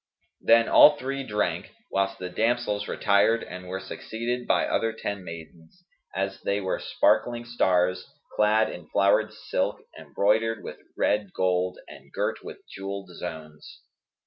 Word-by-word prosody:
Then 115 0 +5
all 150 0 +8
three 135 0 -3
drank, 105 - -2 0.2
whilst 95 0 0
the 90 0 -6
damsels 110 -1 0
retired 105 +3 +2
and 90 0 -9
were 95 +1 -4
succeeded 115 +5 -4
by - - +3
other 115 - 0
ten 100 -3 -5
maidens, 85 - -11 0.3
as 95 +1 -2
they 100 +1 0
were 95 -2 -2
sparkling 120 -1 +1
stars, 90 -6 +1 0.3
clad 110 +1 +3
in 90 - -9
flowered 100 +2 +3
silk - - -2 0.2
embroidered 110 +2 0
with - - -8 0.2
red 105 -3 0
gold 90 0 0
and - - -14
girt - - -2
with - - -10
jewelled 100 0 -6
zones. 80 -3 -9
100 Hz, 140 wpm, -26 LUFS, 90-115 Hz, 0.3 s, all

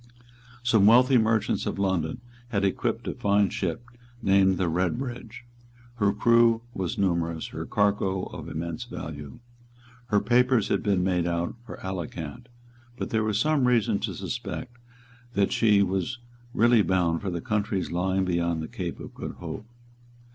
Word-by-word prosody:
Some 110 -4 +4
wealthy 125 +3 +6
merchants 110 -1 +1
of - - -2
London 95 -3 -1 0.3
had 100 -4 0
equipped 95 - -1
a - - -1
fine 100 0 +2
ship 95 +5 -3 0.3
named 95 -3 +3
the 90 - 0
Redbridge. 120 +8 -3 0.5
Her 100 -3 +3
crew 115 +2 +4
was 95 -4 -3
numerous, 85 -4 0
her - - -6
cargo 100 -2 +1
of - - -7
immense 85 +8 -4
value. 75 - -7 0.7
Her 105 -3 +3
papers 125 +1 +3
had - - +1
been 100 -4 +1
made 90 -2 +1
out 85 0 -1
for - - -8
Alicant: 90 +2 -5 0.5
but - - -4
there 110 -2 +1
was 110 -1 0
some 145 -1 +2
reason 115 -5 +2
to 100 -3 -3
suspect 120 +7 -5 0.6
that 100 -1 +2
she 105 -3 +4
was 95 +6 -1 0.4
really 120 -1 +5
bound 90 -4 +1
for 100 - -3
the 85 -1 -3
countries 105 0 -1
lying 95 +2 0
beyond 85 -2 0
the - - -5
Cape - - -5
of - - -9
Good - - -6
Hope. 110 - -7
100 Hz, 155 wpm, -26 LUFS, 90-115 Hz, 0.7 s, wealthy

